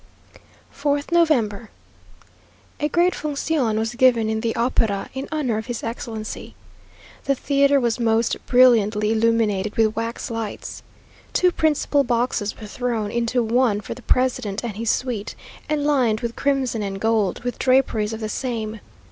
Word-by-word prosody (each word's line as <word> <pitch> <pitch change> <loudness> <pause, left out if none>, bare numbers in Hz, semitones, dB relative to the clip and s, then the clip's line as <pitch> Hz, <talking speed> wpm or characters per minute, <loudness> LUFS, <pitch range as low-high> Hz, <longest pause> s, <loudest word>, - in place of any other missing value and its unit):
4th 285 +2 -1
November. 240 -11 +2 1.1
A 295 - 0
great 350 +3 +3
función 285 -6 -1
was 225 +2 -1
given 240 -3 +3
in 220 0 -1
the 230 -1 -1
opera 225 -4 0
in 265 +1 -5
honour 260 -8 0
of 220 - -8
his 240 -2 -4
excellency. 225 -2 -6 0.7
The 275 - +2
theatre 280 +1 +3
was 240 -1 0
most 225 0 +2
brilliantly 220 -4 +4
illuminated 220 -3 +1
with 220 -1 +2
wax 230 +3 -4
lights. 225 -2 -5 0.5
Two 360 0 +3
principal 300 -3 +1
boxes 235 -4 -1
were 220 - -8
thrown 225 -1 -2
into 235 +1 0
one 230 -2 +2
for 205 - -6
the 255 - -13
president 250 -5 0
and 230 -4 -4
his 225 +1 -2
suite, 235 -5 -2 0.3
and 300 -1 0
lined 250 -7 +2
with 235 -1 -3
crimson 270 -5 0
and 195 -1 -4
gold, 220 -2 0
with 245 0 -4
draperies 255 -5 +2
of 220 0 -6
the 215 - -2
same. 220 -2 -3
235 Hz, 150 wpm, -22 LUFS, 220-260 Hz, 1.1 s, brilliantly